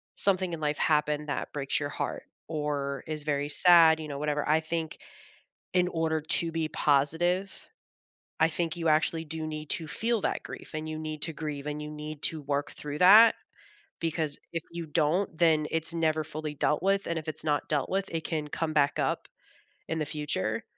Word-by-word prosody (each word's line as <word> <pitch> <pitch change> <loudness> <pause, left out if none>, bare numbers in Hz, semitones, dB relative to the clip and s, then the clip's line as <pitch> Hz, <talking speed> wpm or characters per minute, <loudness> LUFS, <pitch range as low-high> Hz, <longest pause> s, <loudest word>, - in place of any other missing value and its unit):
something 185 -2 +2
in 160 - -4
life 150 -1 -1
happen 150 -1 +1
that 145 - -3
breaks 140 -2 -1
your 145 -1 -3
heart - - -4 0.2
or 145 -3 -2
is 155 -2 -4
very 145 -1 -1
sad, 165 -1 +6
you 155 - -6
know, 140 -1 -5
whatever, 150 0 -1
I 155 +1 +5
think 160 0 -3 0.8
in 180 -1 +3
order 160 -2 0
to 165 +2 +2
be 160 -1 -1
positive, 165 +8 +1 0.7
I 160 - +5
think 165 0 -2
you 165 -1 -1
actually 160 +1 +2
do 160 0 -4
need 155 -1 -6
to 165 - -1
feel 230 +3 0
that - - -1
grief, - - -9
and 155 0 -4
you 155 0 -4
need 155 -1 -5
to 160 - -2
grieve, 150 -2 -5
and 150 0 -3
you 150 - -6
need 150 0 -7
to 160 - -1
work 140 +1 -2
through 150 0 -6
that. 215 +5 +8 0.7
Because 160 -3 -1
if 165 -2 -2
you 170 -1 -5
don't, 160 +3 0
then 160 -3 +4
it's 165 0 -1
never 155 -1 +1
fully 155 0 -5
dealt 150 +1 +1
with, 195 +1 +1
and 170 -1 -1
if 160 0 -8
it's 155 - -1
not 150 -1 0
dealt 145 -3 0
with, 195 0 -1
it 165 -1 -3
can 155 -3 -2
come 155 +1 -2
back 145 -1 +2
up - - -1 0.6
in 160 - -2
the - - +1
future, 145 - -2
155 Hz, 195 wpm, -28 LUFS, 150-165 Hz, 0.8 s, that